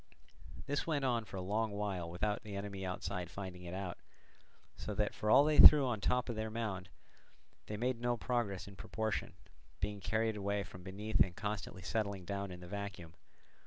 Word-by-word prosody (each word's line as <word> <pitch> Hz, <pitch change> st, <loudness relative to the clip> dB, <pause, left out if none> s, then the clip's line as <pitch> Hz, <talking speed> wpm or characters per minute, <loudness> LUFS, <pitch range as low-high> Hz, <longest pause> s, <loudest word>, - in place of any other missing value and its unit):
This 145 Hz, +3 st, -1 dB
went 145 Hz, -4 st, 0 dB
on 120 Hz, -3 st, +1 dB
for 95 Hz, -1 st, -8 dB
a 90 Hz, -, -3 dB
long 110 Hz, +4 st, 0 dB
while 100 Hz, -4 st, -3 dB
without 105 Hz, +5 st, -1 dB
the 105 Hz, -2 st, -7 dB
enemy 100 Hz, -1 st, -5 dB
outside 90 Hz, -1 st, -3 dB
finding 90 Hz, -2 st, -7 dB
it 85 Hz, +1 st, -5 dB
out, 95 Hz, -2 st, -4 dB, 0.8 s
so -, -, -5 dB
that -, -, 0 dB
for 105 Hz, -, -2 dB
all 140 Hz, -, +8 dB
they 150 Hz, 0 st, +2 dB
threw 150 Hz, -3 st, +11 dB
on 120 Hz, -4 st, -1 dB
the 100 Hz, -, -2 dB
top 125 Hz, 0 st, +2 dB
their 110 Hz, -2 st, -3 dB
mound 105 Hz, -5 st, -3 dB, 0.8 s
made 115 Hz, +3 st, -1 dB
no 120 Hz, 0 st, +1 dB
progress 115 Hz, -6 st, -1 dB
in 100 Hz, -, -10 dB
proportion, 110 Hz, +3 st, -3 dB, 0.4 s
being 100 Hz, +1 st, -2 dB
carried 110 Hz, +2 st, 0 dB
away 100 Hz, 0 st, -1 dB
from 90 Hz, 0 st, -11 dB
beneath 100 Hz, +4 st, -3 dB
and 90 Hz, -, +4 dB
constantly 105 Hz, -2 st, -4 dB
settling 100 Hz, -2 st, -2 dB
down 100 Hz, +1 st, -3 dB
in 90 Hz, -1 st, -8 dB
the 90 Hz, -, -9 dB
vacuum. 100 Hz, -4 st, -6 dB
100 Hz, 185 wpm, -35 LUFS, 95-110 Hz, 0.8 s, threw